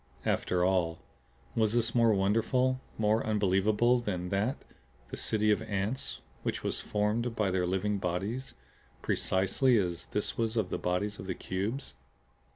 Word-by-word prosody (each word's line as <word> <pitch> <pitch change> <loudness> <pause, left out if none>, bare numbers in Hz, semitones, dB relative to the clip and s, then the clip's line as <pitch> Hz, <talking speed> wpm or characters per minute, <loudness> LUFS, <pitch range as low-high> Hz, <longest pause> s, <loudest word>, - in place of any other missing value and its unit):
After 90 0 +1
all, 90 -3 +1 0.6
was 110 -2 +2
this 120 -1 +2
more 115 -2 +5
wonderful, 115 +6 +2 0.2
more 110 +1 +2
unbelievable 105 +3 +3
than 90 -6 -3
that 105 +8 0 0.5
the - - -3
city 110 -1 +2
of 105 - +2
ants 110 +3 -2 0.2
which - - -3
was - - -1
formed 110 +3 0
by 105 -4 +1
their 90 -1 +1
living 100 +2 0
bodies 95 +9 -3 0.5
precisely 95 - +2
as 90 -4 -1
this 105 - -2
was 115 0 0
of 105 -5 0
the - - -1
bodies 100 +4 -1
of 95 - -7
the 95 - -2
Cubes? 100 - -3
105 Hz, 150 wpm, -30 LUFS, 95-115 Hz, 0.6 s, more